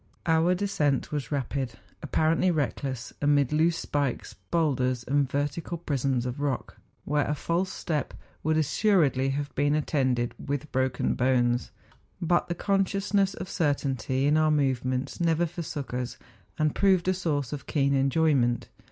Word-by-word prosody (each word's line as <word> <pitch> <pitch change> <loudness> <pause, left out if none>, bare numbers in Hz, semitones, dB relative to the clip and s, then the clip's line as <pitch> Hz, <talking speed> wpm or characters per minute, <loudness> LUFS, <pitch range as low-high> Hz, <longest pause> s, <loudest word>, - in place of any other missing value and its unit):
Our 165 +2 +3
descent 155 -8 0
was 150 -1 -3
rapid, 135 -3 -2 0.3
appa¬ 155 +2 +2
rently 185 +2 +2
reckless, 135 -5 -2
amid 145 -1 +3
loose 165 +2 +3
spikes, 140 -4 -2 0.2
hoidders, 130 -7 +1
and 140 0 +2
vertical 145 +5 -2
prisms 135 -6 -1
of 125 +3 -4
rock, 140 -3 -2 0.3
where 145 0 +1
a 150 - 0
false 175 +5 -1
step 150 -5 -3 0.3
would 155 +1 +1
as¬ - - +4 0.2
suredly 145 -11 +3
have 145 +1 -3
been 145 +1 +2
attended 130 -5 0
"with 145 +1 -3
broken 130 -1 0
bones; 125 -1 +1 0.5
but 175 +1 +1
the 175 - -2
consciousness 195 +1 +1
of 185 - -6
certainty 140 - 0
in 150 +2 +4
our 155 0 +3
movements 130 -2 0
never 170 0 +2
forsook 155 -6 -5
us, 125 -1 -3 0.4
and 155 -1 +1
proved 190 -3 +3
a 185 - +4
source 150 -8 -2
of 145 - -6
keen 140 -2 +1 0.2
enjoy¬ 160 +1 +3
ment. 120 -2 +1
145 Hz, 150 wpm, -27 LUFS, 130-165 Hz, 0.5 s, as¬